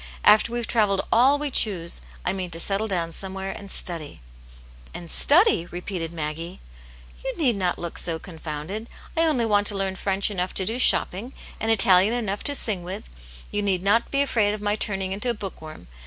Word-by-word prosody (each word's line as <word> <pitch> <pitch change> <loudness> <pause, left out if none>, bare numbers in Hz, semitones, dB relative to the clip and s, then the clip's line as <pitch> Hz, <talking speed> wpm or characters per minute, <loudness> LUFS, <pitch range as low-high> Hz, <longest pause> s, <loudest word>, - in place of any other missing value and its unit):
After 210 +2 +5
we've 240 -1 -2
travelled 210 -5 +1
all 260 +5 +4
we 290 -1 -3
choose, 175 - +2 0.2
I - - +1
mean 185 -2 -4
to 165 - -6
settle 200 +5 -1
down 170 -4 -2
somewhere 190 +2 -1
and 200 - -10
study! 165 -6 +1 0.8
"And 170 -2 -7
study 315 - +4
r - - -18
repeated 175 -2 -5
Maggie. 165 +2 -6 0.6
You 265 - -4
need 265 -9 +2
not 185 -3 -1
look 170 -1 -6
so 165 -2 -3
confounded. 165 +5 -7 0.3
I 330 0 +3
only 255 -7 +1
want 205 -2 +3
to 205 - +3
learn 195 -1 -1
French 195 +2 0
enough 185 -2 -3
to 190 - +1
do 230 +5 -2
shopping, 235 +1 +3 0.3
and 225 - -2
Italian 195 0 +5
enough 205 -4 -3
to 285 - +1
sing 210 -8 -1
with; 175 - -8 0.4
you 205 - -1
need 190 -3 -1
not 205 +4 +2
be 275 0 +2
afraid 210 -6 +1
of - - -9
my 205 0 0
turning 195 -3 -2
into 210 +6 0
a 235 - -1
book 195 -5 -8
worm. 155 - -11
195 Hz, 200 wpm, -24 LUFS, 180-225 Hz, 0.8 s, After